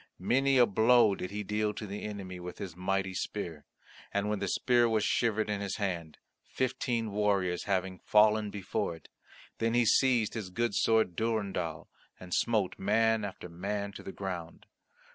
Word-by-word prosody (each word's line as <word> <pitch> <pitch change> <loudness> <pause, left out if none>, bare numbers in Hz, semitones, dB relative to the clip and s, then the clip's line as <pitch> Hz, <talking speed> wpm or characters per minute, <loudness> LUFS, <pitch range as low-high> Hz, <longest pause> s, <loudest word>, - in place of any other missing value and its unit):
Many 135 +2 +2
a 125 - +7
blow 110 +1 +5
did 90 -1 -5
he 105 +1 -4
deal 105 +1 -1
to 105 - -5
the 100 0 -6
enemy 95 -4 -6
with 90 0 -8
his 90 -4 -6
mighty 95 +1 -1
spear, 90 -5 -4 0.5
and 100 +1 0
when 105 -1 -1
the 100 - -2
spear 120 +4 +3
was 110 -2 +1
shivered 110 -2 +1
in 105 -1 -2
his 100 -1 -3
hand, 85 -6 -3 0.3
fifteen 120 -3 -2
warriors 100 -4 0
having 95 -2 -1
fallen 105 0 +4
before 95 -4 -3
it, 80 - -17 0.5
then 115 +1 +1
he 120 -1 +4
seized 120 -1 +3
his 110 -5 -5
good 115 +4 -1
sword 110 -3 +2
Durendal, 100 -8 -2 0.3
and 90 -1 -8
smote 110 -6 +1
man 110 +2 +2
after 95 -3 -6
man 100 +4 -4
to - - -10
the - - -7
ground. 90 -4 -6
105 Hz, 170 wpm, -30 LUFS, 95-110 Hz, 0.5 s, a